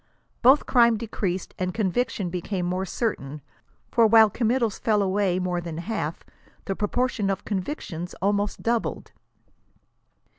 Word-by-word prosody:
Both 265 Hz, +4 st, +6 dB
crime 235 Hz, -3 st, +4 dB
decreased 195 Hz, -4 st, -3 dB
and 185 Hz, -1 st, -2 dB
conviction 210 Hz, -2 st, -1 dB
became 180 Hz, +1 st, -3 dB
more 185 Hz, +2 st, -2 dB
certain; 150 Hz, -, -3 dB, 0.5 s
for 230 Hz, -1 st, +5 dB
while 220 Hz, -1 st, +6 dB
committals 235 Hz, -1 st, 0 dB
fell 215 Hz, -2 st, +2 dB
away 190 Hz, -1 st, +1 dB
more 180 Hz, -1 st, -1 dB
than 165 Hz, -2 st, -6 dB
half, 170 Hz, -3 st, -4 dB, 0.4 s
the 195 Hz, -, -2 dB
proportion 215 Hz, 0 st, 0 dB
of 195 Hz, -, -2 dB
convictions 185 Hz, -, -4 dB
almost 205 Hz, +1 st, 0 dB
doubled. 230 Hz, 0 st, -1 dB
200 Hz, 125 wpm, -25 LUFS, 180-230 Hz, 0.5 s, Both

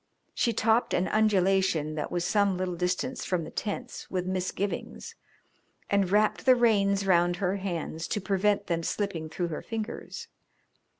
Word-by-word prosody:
She 235 Hz, -, +1 dB
topped 225 Hz, +1 st, +2 dB
an 185 Hz, -, +1 dB
undulation 190 Hz, -7 st, +2 dB
that 155 Hz, -1 st, -4 dB
was 175 Hz, 0 st, -1 dB
some 200 Hz, -2 st, +2 dB
little 185 Hz, -1 st, -2 dB
distance 185 Hz, +9 st, -2 dB
from 180 Hz, -3 st, -1 dB
the 155 Hz, -, -8 dB
tents 205 Hz, -1 st, -5 dB
with 180 Hz, -1 st, -2 dB
misgivings, 185 Hz, +2 st, -3 dB, 0.8 s
and 200 Hz, -2 st, +2 dB
wrapped 210 Hz, +6 st, +2 dB
the 255 Hz, -, +8 dB
reins 200 Hz, -5 st, +3 dB
round 175 Hz, -2 st, +3 dB
her 190 Hz, +1 st, -1 dB
hands 170 Hz, -4 st, -4 dB
to 210 Hz, -, -1 dB
prevent 200 Hz, +1 st, +1 dB
them 170 Hz, -2 st, -1 dB
slipping 165 Hz, -3 st, -3 dB
through 175 Hz, +2 st, -3 dB
her 155 Hz, -, -4 dB
fingers. 220 Hz, -1 st, -6 dB
190 Hz, 155 wpm, -28 LUFS, 175-205 Hz, 0.8 s, the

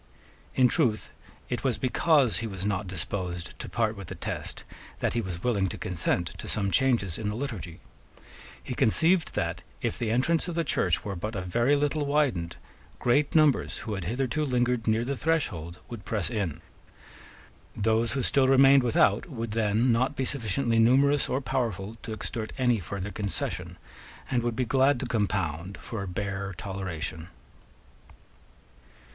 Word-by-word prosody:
In 130 Hz, -1 st, +6 dB
truth 120 Hz, -7 st, 0 dB, 0.4 s
it 120 Hz, -3 st, -3 dB
was 125 Hz, -5 st, +1 dB
because 130 Hz, -, +3 dB
he 115 Hz, -, -3 dB
was 95 Hz, -2 st, -5 dB
not 105 Hz, -1 st, -1 dB
disposed 90 Hz, -1 st, -3 dB
to -, -, -6 dB
part 110 Hz, -2 st, 0 dB
with 100 Hz, -4 st, -8 dB
the -, -, -6 dB
Test -, -, -5 dB, 0.3 s
that -, -, 0 dB
he 120 Hz, -, +1 dB
was 90 Hz, -4 st, -5 dB
willing 100 Hz, -6 st, +1 dB
to -, -, -5 dB
consent 85 Hz, -1 st, -1 dB
to -, -, -6 dB
some 100 Hz, -2 st, 0 dB
changes 120 Hz, -10 st, +2 dB
in 105 Hz, -2 st, -2 dB
the 105 Hz, -, -3 dB
Liturgy. 110 Hz, -, -5 dB, 0.8 s
He -, -, -4 dB
conceived 165 Hz, -, +3 dB
that, -, -, -1 dB, 0.2 s
if -, -, -2 dB
the 115 Hz, -, -1 dB
entrance 145 Hz, +10 st, +2 dB
of 175 Hz, -, -4 dB
the 170 Hz, -, +1 dB
Church -, -, +1 dB
were 100 Hz, -2 st, -3 dB
but 105 Hz, +5 st, -4 dB
a 95 Hz, -, -2 dB
very 120 Hz, +10 st, +2 dB
little 145 Hz, +1 st, +1 dB
widened, 140 Hz, -, 0 dB, 0.4 s
great 145 Hz, +6 st, +2 dB
numbers 155 Hz, -3 st, +3 dB
who 110 Hz, -, -3 dB
had 95 Hz, -4 st, -4 dB
hitherto 130 Hz, -, -1 dB
lingered 125 Hz, -4 st, +1 dB
near 110 Hz, +2 st, +2 dB
the 140 Hz, +2 st, -1 dB
threshold 105 Hz, -, -1 dB
would 115 Hz, -4 st, -8 dB
press 105 Hz, -1 st, -2 dB
in. 90 Hz, -8 st, -2 dB, 1.1 s
Those 110 Hz, +2 st, +1 dB
who 135 Hz, -2 st, -1 dB
still 135 Hz, +1 st, +3 dB
remained 135 Hz, +1 st, +7 dB
without 115 Hz, -, +2 dB
would 115 Hz, -6 st, -4 dB
then 110 Hz, +3 st, +2 dB
not 125 Hz, +5 st, +1 dB
be 135 Hz, -, -1 dB
sufficiently 115 Hz, -2 st, 0 dB
numerous 135 Hz, +5 st, +4 dB
or 130 Hz, -, 0 dB
powerful 115 Hz, -6 st, -2 dB
to -, -, -7 dB
extort 110 Hz, 0 st, -4 dB
any 125 Hz, -3 st, +2 dB
further 100 Hz, +3 st, -5 dB
concession, 100 Hz, -2 st, -3 dB, 0.5 s
and 125 Hz, -2 st, +2 dB
would 120 Hz, -1 st, -1 dB
be 125 Hz, -, 0 dB
glad 135 Hz, +2 st, +3 dB
to -, -, -2 dB
compound 95 Hz, -6 st, -1 dB
for 115 Hz, -3 st, -6 dB
a 100 Hz, -, -4 dB
bare 100 Hz, +1 st, -3 dB
toleration. 90 Hz, -5 st, -5 dB
115 Hz, 165 wpm, -28 LUFS, 100-130 Hz, 1.1 s, remained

